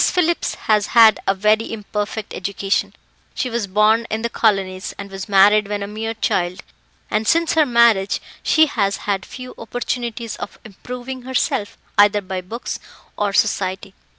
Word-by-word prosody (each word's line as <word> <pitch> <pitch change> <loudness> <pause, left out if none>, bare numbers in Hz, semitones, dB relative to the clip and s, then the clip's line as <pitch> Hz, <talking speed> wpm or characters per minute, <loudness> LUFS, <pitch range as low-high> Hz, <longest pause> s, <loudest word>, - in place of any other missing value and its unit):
Phillips 345 -1 0
has 210 -1 +3
had 225 -2 +8
a 195 - +3
very 215 +3 +2
imperfect 210 -1 -4
education; 195 +1 -1 0.4
she 250 - -2
was 230 -3 -2
born 215 +4 +3
in 220 +1 -3
the 235 - -1
colonies, 195 -3 0
and 200 -1 -8
was 195 +2 -7
married 205 +1 +5
when 205 0 -3
a - - -5
mere 220 +2 -4
child, 180 -1 -1 0.5
and 215 +1 0
since 335 +3 +3
her 310 -2 +4
marriage 235 -5 +3 0.2
she 315 0 +4
has 200 -9 0
had 200 -2 -1
few 255 0 -9
opportunities 235 -1 -4
of - - -7
improving 250 +5 -7
herself 245 -5 -1 0.2
either 205 0 +6
by 190 -1 -5
books 225 +7 -6 0.4
or 205 -1 0
society. 195 -1 0
215 Hz, 155 wpm, -20 LUFS, 200-235 Hz, 0.5 s, had